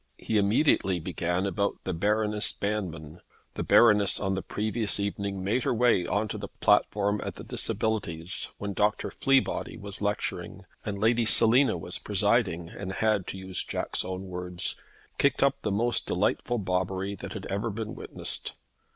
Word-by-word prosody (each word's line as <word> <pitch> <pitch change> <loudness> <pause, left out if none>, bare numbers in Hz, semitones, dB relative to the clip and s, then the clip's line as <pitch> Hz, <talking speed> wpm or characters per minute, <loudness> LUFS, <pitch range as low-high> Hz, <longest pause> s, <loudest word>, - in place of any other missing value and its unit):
He 110 - -1
immediately 100 - +2
began 90 +2 -2
about 100 +1 -1
the 95 - -3
Baroness 105 +4 +1
Banmann. 90 -6 -4 0.3
The - - -5
Baroness 105 -4 +5
had - - -1
on 95 - 0
the 95 - -2
previous 110 +1 0
evening 100 -1 -3
made 105 +7 0
her 120 - 0
way 115 -7 +2
on 105 +1 0
to - - -5
the - - -6
platform 105 0 +1
at - - -5
the - - -9
Disabilities 95 -6 0
when 100 0 -4
Dr. 105 +2 0
Fleabody 135 -1 0
was 100 0 -4
lecturing, 105 0 -3 0.2
and 100 -1 -4
Lady 115 +2 +2
Selina 115 0 +6
was 80 - -4
presiding 85 0 +1
and 95 +1 -7
had, 105 -3 0
to - - -5
use 95 -1 0
Jack's - - -1
own 95 0 -5
words, 90 -1 +1 0.4
"Kicked 140 -1 +2
up 140 0 +1
the 105 - -2
most 120 +4 +1
delightful 120 - 0
bobbery 95 0 -2
that 100 - -8
had - - -7
ever 100 +4 -2
been 110 +1 -5
witnessed! - - -3
100 Hz, 165 wpm, -27 LUFS, 95-110 Hz, 0.4 s, Selina